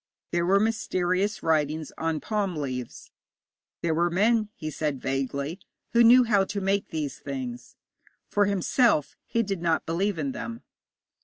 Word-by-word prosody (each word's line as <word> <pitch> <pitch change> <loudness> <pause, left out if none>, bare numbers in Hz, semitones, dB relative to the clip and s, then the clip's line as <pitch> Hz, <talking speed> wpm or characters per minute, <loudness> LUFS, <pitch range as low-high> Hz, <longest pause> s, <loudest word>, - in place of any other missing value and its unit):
There 170 0 +1
were 195 +2 +5
mysterious 200 -2 0
writings 155 -1 0
on 160 -1 -2
palm 205 -5 -1
leaves. 130 -4 -5 0.7
There 165 -1 +1
were 170 +2 +2
men, 215 +4 +2
he 155 0 -5
said 150 -3 -2
vaguely, 140 +5 -2 0.3
who 235 0 +6
knew 245 +2 +8
how 210 -4 +3
to 200 +1 -3
make 195 +1 0
these 150 -3 -4
things. 250 -3 -6 0.5
For 205 0 +2
himself, 200 - +2
he 230 - +1
did 195 -4 -3
not 165 -2 +1
believe 185 +4 0
in 140 -3 -1
them. 115 -2 -6
175 Hz, 150 wpm, -26 LUFS, 155-205 Hz, 0.7 s, knew